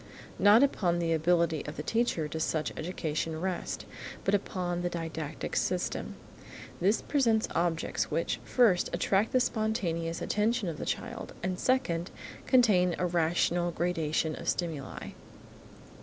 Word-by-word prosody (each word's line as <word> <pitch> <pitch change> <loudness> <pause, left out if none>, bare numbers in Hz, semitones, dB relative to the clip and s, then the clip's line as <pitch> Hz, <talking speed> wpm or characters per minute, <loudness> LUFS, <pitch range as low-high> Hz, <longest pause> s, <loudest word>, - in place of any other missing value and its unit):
Not 210 +5 +7
upon 180 -11 +2
the 165 -1 +1
ability 165 -1 +2
of 150 - -6
the 150 - -4
teacher 225 -7 0
does 160 +1 -2
such 155 -2 -1
education 160 -1 -3
rest, 185 0 -3 0.4
but 195 - +1
upon 180 -3 -1
the 175 - -1
didactic 165 -3 -5
system. - - -1 0.6
This 200 +5 +2
presents 230 -6 +2
objects 170 -1 0
which, - - -1
first, 220 -8 +3
attract 195 +4 +1
the 255 - +4
spontaneous 185 -9 -1
attention 215 0 0
of 160 - -5
the - - -5
child, - - -4
and, 185 0 -2
second, 190 -10 +1 0.4
contain 195 -9 +4
a 180 - 0
rational 175 0 +1
gradation 160 -2 -1
of - - -4
stimuli. 160 -6 -3
175 Hz, 135 wpm, -30 LUFS, 165-205 Hz, 0.6 s, Not